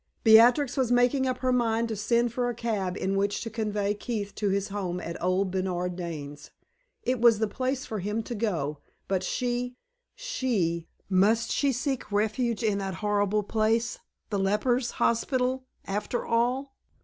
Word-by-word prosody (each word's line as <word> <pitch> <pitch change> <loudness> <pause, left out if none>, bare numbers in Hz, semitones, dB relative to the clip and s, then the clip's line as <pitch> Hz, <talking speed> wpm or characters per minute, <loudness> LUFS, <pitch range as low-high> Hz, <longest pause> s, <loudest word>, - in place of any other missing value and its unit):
Beatrix 240 +5 +6
was 255 -3 +1
making 245 +2 +3
up 255 - -1
her 255 - +3
mind 230 -2 +1
to 220 - -2
send 235 +3 +1
for 245 0 0
a 240 - -3
cab 205 -5 -2
in 195 +1 -1
which 200 +1 0
to 225 - -5
convey 210 -2 -1
Keith 210 -2 -4
to 205 -2 -1
his 200 +1 0
home 185 -3 -3
at 170 -1 -5
old 185 +1 +1
Bernard 180 -1 -1
Dane's. 150 -5 -6 0.5
It 250 -1 0
was 235 -2 +6
the 220 +1 +1
place 260 +4 -2
for 215 - -4
him 210 +4 -2
to 240 - -5
go, 170 -10 -2 0.3
but 190 -2 0
she 245 +5 -2 0.4
she 215 - -1 0.2
must 210 +5 +3
she 280 -1 +2
seek 250 -3 -2
refuge 220 +3 0
in 210 -2 +1
that 195 -2 -3
horrible 205 0 +2
place, 225 - 0 0.3
the 200 - 0
lepers' 240 +6 +1
hospital, 255 +2 +1 0.2
after 210 +4 -2
all? 250 +4 0
220 Hz, 165 wpm, -27 LUFS, 195-245 Hz, 0.5 s, Beatrix